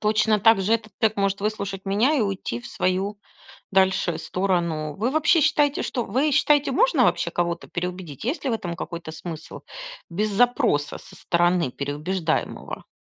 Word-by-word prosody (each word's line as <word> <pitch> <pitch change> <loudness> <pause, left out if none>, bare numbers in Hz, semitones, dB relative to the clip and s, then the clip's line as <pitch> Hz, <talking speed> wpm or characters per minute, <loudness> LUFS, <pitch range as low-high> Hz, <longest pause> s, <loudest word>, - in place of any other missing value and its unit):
Точно 215 0 +2
также 220 0 +4
этот 220 -2 -4
тег 220 -1 +2
может 195 0 0
выслушать 200 -2 -3
меня 205 +9 +2
и 285 - +2
уйти 195 - -2
в - - -10
свою 195 +3 -1 0.5
дальше 190 -3 +2
сторону. 170 -5 -1
Вы, 230 +5 0
вообще, 315 +3 +3
считаете, 290 0 +2
что 245 -3 -2
вы 265 +9 +1
считаете, 290 +1 +3
можно - - +3
вообще - - +1
кого-то 170 -1 -2
переубедить? 180 -4 -5
Есть 275 +8 -2
ли 270 - 0
в - - +1
этом 175 -6 -4
какой-то 170 -1 -6
смысл, 160 0 -8 0.5
без 210 +5 -1
запроса 225 - +2
со - - -15
стороны 175 -3 +1
переубеждаемого? 155 +5 -3
195 Hz, 155 wpm, -24 LUFS, 170-225 Hz, 0.5 s, также